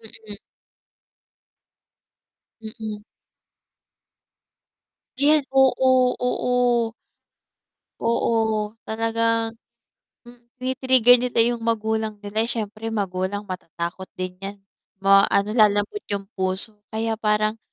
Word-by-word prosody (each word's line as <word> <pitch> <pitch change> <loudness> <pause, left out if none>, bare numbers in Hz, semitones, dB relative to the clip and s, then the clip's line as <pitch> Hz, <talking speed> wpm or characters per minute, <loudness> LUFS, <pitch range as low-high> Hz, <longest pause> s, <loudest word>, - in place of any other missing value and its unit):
Mm. 220 -1 -7 2.2
Mm. 220 -1 -7 2.2
Ayan, 295 +1 +4
oo, 260 -1 +4
oo. 245 -2 +1 1.1
Oo, 220 -2 +1 0.2
talagang 230 0 0 0.7
mm, 240 0 -16
tini-trigger 255 -1 +4
nila 245 -2 0
'yung 240 0 -1
magulang 220 -1 -1
nila. 205 +1 -2
Eh, - - -8
siyempre 220 -1 -3
magulang 200 -1 -2
matatakot 180 -1 -6
din 185 0 -5
yan. 200 +1 -6 0.5
Ma 195 0 +6
ano, 200 +1 +1
lalambot 210 - +3
yung 200 -1 -2
puso 190 +3 -2
kaya 225 +1 -2
parang 215 +1 +1
220 Hz, 90 wpm, -23 LUFS, 205-240 Hz, 2.2 s, Ma